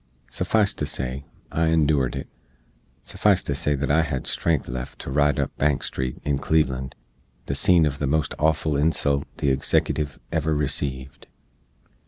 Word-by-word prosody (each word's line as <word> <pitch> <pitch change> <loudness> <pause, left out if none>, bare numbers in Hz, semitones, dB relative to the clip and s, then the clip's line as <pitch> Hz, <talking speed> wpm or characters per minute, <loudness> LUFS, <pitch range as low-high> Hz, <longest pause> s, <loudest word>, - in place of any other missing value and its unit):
Suffice 105 -2 +2
to - - -3
say, 65 +2 -3 0.3
I 80 0 +1
endoored 75 -5 +2
it; - - -5 0.8
suffice - - +2
to - - -1
say 75 0 0
that 70 0 -1
I 80 +3 +4
hed 65 -5 -3
strength 80 -4 0
left 65 +1 -6
to - - -6
ride 75 +1 +2
up - - -2
Bank 75 -1 +1
street, 65 -1 -3
in 70 -2 0
Cleveland, 65 -4 0 0.5
the - - -2
seen 85 +4 +4
uv 70 -2 0
the 70 - 0
most 75 +3 0
awful 80 -1 +1
insult 70 -2 +1
the 70 - +1
Eggsecutive 70 +1 0
ever 80 -1 0
receeved. 65 -2 -2
70 Hz, 160 wpm, -24 LUFS, 65-80 Hz, 0.8 s, I